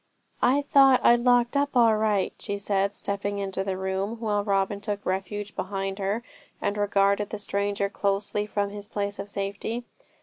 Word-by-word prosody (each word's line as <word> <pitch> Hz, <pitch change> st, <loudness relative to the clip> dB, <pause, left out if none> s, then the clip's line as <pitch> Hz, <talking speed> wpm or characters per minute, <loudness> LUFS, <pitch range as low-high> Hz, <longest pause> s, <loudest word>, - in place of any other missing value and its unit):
'I 275 Hz, +4 st, +3 dB
thought 275 Hz, -3 st, +5 dB
I'd 240 Hz, 0 st, +7 dB
locked 245 Hz, +1 st, +3 dB
up 280 Hz, -2 st, +1 dB
all 230 Hz, -2 st, +6 dB
right,' 215 Hz, -2 st, +1 dB
she 200 Hz, -, -3 dB
said, 200 Hz, 0 st, 0 dB
stepping 200 Hz, 0 st, -3 dB
into 195 Hz, -1 st, -2 dB
the 190 Hz, -1 st, -2 dB
room, 190 Hz, +4 st, -2 dB
while 210 Hz, -3 st, 0 dB
Robin 200 Hz, 0 st, 0 dB
took 205 Hz, -1 st, -4 dB
refuge 195 Hz, +2 st, -3 dB
behind 195 Hz, 0 st, -3 dB
her, 200 Hz, +4 st, -1 dB, 0.4 s
and 200 Hz, -, -1 dB
regarded 200 Hz, 0 st, +2 dB
the 215 Hz, -, -4 dB
stranger 200 Hz, 0 st, -1 dB
closely 200 Hz, +1 st, -1 dB
from 200 Hz, -1 st, -1 dB
his 205 Hz, 0 st, -8 dB
place 200 Hz, -1 st, -3 dB
of 200 Hz, +1 st, -5 dB
safety. 200 Hz, +4 st, -3 dB
205 Hz, 170 wpm, -26 LUFS, 195-215 Hz, 0.4 s, I'd